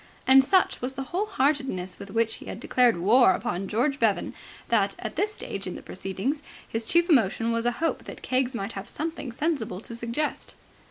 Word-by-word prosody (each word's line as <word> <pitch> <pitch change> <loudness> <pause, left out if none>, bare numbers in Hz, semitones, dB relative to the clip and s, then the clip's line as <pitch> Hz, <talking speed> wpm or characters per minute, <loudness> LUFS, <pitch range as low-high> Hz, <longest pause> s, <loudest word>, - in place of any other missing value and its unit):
And 265 +1 +8
such 370 +7 +2
was 250 +2 -3
the 270 - -4
whole 405 +4 0
heartedness 265 - 0
with 200 - -9
which 225 +2 0
he - - -12
had - - -6
declared 245 -3 +3
war 205 +3 +5
upon 190 +2 -3
George 270 +7 0
Bevan 220 -4 +1 0.4
that, 200 -4 +2
at - - -6
this 415 +4 +1
stage 200 - -6
in 180 - -5
the - - -9
proceedings, 195 +10 -3 0.3
his 225 0 -3
chief 340 0 +3
emotion 230 - +3
was 230 +1 0
a - - +3
hope 325 +6 -2
that - - -9
Keggs 255 0 0
might 200 0 -3
have 195 -1 -6
something 310 -4 -4
sensible 245 - -2
to 230 - -6
suggest. 235 +6 -3
240 Hz, 200 wpm, -26 LUFS, 205-285 Hz, 0.4 s, And